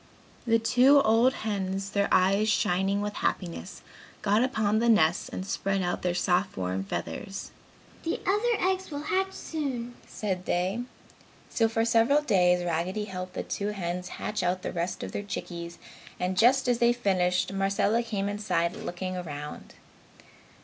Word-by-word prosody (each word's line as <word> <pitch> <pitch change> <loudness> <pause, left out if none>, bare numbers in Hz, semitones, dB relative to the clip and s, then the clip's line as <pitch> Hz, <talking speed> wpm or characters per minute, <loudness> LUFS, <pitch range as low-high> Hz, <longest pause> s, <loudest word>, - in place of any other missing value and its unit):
The 230 0 +5
two 250 +5 +5
old 225 +4 +4
hens, 195 -2 -2
their 200 0 +1
eyes 195 +4 +4
shining 195 0 +1
with 205 0 -3
happiness, 180 +1 -3 0.4
got 210 +3 +3
upon 220 -5 +1
the 235 +1 +2
nests 175 -7 +3
and 185 - -5
spread 195 -1 -1
out 175 - -1
their 175 -1 0
soft 180 +2 +1
warm 95 +1 -2
feathers, 195 - -5 0.5
"The 330 - -2
other 415 +1 +2
eggs 380 0 -1
will 290 -1 -5
hatch 380 +4 0
soon!" 260 -7 -4
said 185 -4 -3
they. 185 +6 0 0.7
So, 225 -1 +2
for 225 0 +1
several 235 +6 +4
days 180 -7 +3
Raggedy 175 +5 -1
helped 185 -2 -6
the - - -2
two 200 - -3
hens 180 -1 -4
hatch 210 -1 -2
out 180 +1 0
the - - -3
rest 175 +1 -3
of - - -5
the - - -3
chickies 170 -3 -6 0.4
and 180 +1 -1
just 250 +6 +4
as 245 -1 +2
they 235 +1 +4
finished, 185 -5 +1
Marcella 200 +3 +1
came 205 -4 -2
inside 200 -4 -1
looking 185 -4 -5
around. 150 -4 -7
200 Hz, 155 wpm, -28 LUFS, 180-230 Hz, 0.7 s, The